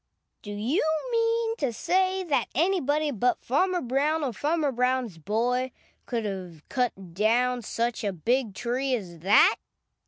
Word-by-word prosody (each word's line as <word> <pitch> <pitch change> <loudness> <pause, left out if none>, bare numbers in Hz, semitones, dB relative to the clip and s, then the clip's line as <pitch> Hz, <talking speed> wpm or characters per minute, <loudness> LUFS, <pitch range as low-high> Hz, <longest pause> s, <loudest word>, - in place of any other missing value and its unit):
"Do 205 - -8
you 230 - 0 0.3
mean 460 0 +1
to 275 -5 0
say 370 - +1
that 300 -6 0
anybody 310 -2 +1
but 245 0 +1
Farmer 360 +7 +1
Brown 285 +5 0
or 260 -4 -1
Farmer 300 - 0
Brown's 250 -6 0
boy 240 +8 0 0.4
could 230 -2 -2
have 180 -6 -6
cut 195 -9 -2
down 240 +5 +2
such 230 +1 -2
a 205 - 0
big 225 +4 0
tree 255 +4 0
as 175 -7 -7
that?" 195 +6 +5
250 Hz, 145 wpm, -27 LUFS, 215-300 Hz, 0.4 s, that